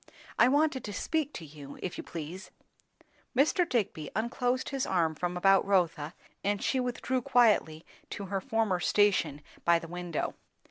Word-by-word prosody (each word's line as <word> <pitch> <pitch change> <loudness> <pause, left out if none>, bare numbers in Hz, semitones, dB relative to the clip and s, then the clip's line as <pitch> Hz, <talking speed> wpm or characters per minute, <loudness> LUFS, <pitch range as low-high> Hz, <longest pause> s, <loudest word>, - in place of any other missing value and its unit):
"I 240 - +7
wanted 285 0 +2
to 205 - -5
speak 310 - -1
to 165 - -7
you, 145 -2 -11
if 180 - -3
you - - -6
please." 170 +3 -7 0.9
Mr. 330 +5 +3
Digby 185 - -1
unclosed 245 +3 0
his 275 -2 -2
arm 170 -4 +1
from 175 +3 -3
about 195 +2 +5
Rotha, 170 -5 +1 0.3
and 205 0 +1
she 260 - 0
withdrew 250 +1 -1
quietly 215 -11 +3 0.2
to 200 - -5
her 195 0 -2
former 225 -6 0
station 175 -8 +2 0.2
by 170 0 +5
the 165 - -7
window. 175 -1 -3
195 Hz, 155 wpm, -30 LUFS, 170-245 Hz, 0.9 s, I